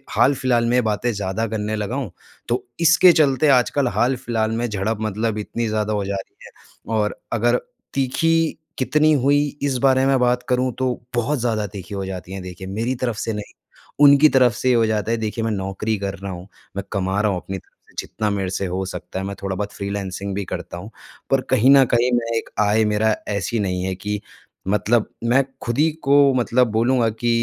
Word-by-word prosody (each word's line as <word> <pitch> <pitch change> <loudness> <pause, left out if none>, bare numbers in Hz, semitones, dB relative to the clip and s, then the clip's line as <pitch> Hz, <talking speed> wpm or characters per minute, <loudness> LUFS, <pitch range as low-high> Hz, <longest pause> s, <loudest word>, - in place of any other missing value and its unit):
हाल-फिलहाल 130 -3 +3
में 125 0 +3
बातें 110 +3 0
ज़्यादा 100 +2 -2
करने 110 0 -2
लगा 105 +4 -3
हूँ। 130 -10 -3 0.4
तो 120 - 0 0.2
इसके 170 +2 +6
चलते 150 -2 +3
आजकल 130 +1 +3
हाल-फिलहाल 120 -3 0
में 120 +1 -1
झड़प 105 +1 -2
मतलब 110 +1 -1
इतनी 115 +2 -3
ज़्यादा 110 0 -1
हो 100 -1 -1
जा 100 0 -2
रही 95 - -7
है - - -12 0.5
और 105 0 0 0.2
अगर 120 +2 +2 0.4
तीखी 140 +5 +1 0.4
कितनी 150 +4 +3
हुई 140 +2 +4 0.2
इस 135 -3 +1
बारे 130 0 +3
में 135 -1 +3
बात 125 0 +2
करूँ, 125 0 +1
तो 125 -2 -1
बहुत 125 +4 0
ज़्यादा 110 -3 0
तीखी 95 0 -9
हो 95 -1 -3
जाती 95 -1 -7
हैं। 95 - -5
देखिए, 90 +1 -8
मेरी 115 +6 -2
तरफ 120 -3 -2
से 110 +1 -2
नहीं, 105 0 -7 0.5
उनकी 145 +1 +8
तरफ 125 -4 +4
से 130 - -1
ये 125 - +4
हो 115 -1 +3
जाता 110 0 -1
है, 115 - +2
देखिए 110 +1 -3
मैं 115 - 0
नौकरी 100 +2 -2
कर 100 -1 -3
रहा 100 -1 -6
हूँ, 90 +2 -9 0.3
मैं 100 - -3
कमा 95 0 0
रहा 105 -1 +2
हूँ, 90 - -2
अपनी 95 0 -5
तरफ - - -22
से - - -25
जितना 105 -1 -2
मेरे 95 -2 -2
से 95 0 -2
हो 95 +2 -2
सकता 90 0 -6
है, 95 - -3
मैं 100 - -5
थोड़ा-बहुत 100 +1 -3
फ्रीलांसिंग 100 -1 -4
भी 100 0 -2
करता 85 - -6
हूँ। 100 +5 -9 0.4
पर 135 -1 +3
कहीं 130 +1 +5
न 135 - +7
कहीं, 120 +2 +3
मैं 115 -1 0
एक - - -7
आय 105 +1 +3
मेरा 105 +1 +2
ऐसी 105 +3 -1
नहीं 90 -2 -1
है 95 0 -2
कि 105 +2 -4 0.5
मतलब 105 +3 +2 0.2
मैं 130 +3 +3 0.2
खुद 120 +2 -3
ही 160 +2 +4
को 140 +1 +5
मतलब 125 0 +2
बोलूँगा 120 +1 +2
कि 115 +2 -3
110 Hz, 210 wpm, -21 LUFS, 100-125 Hz, 0.5 s, उनकी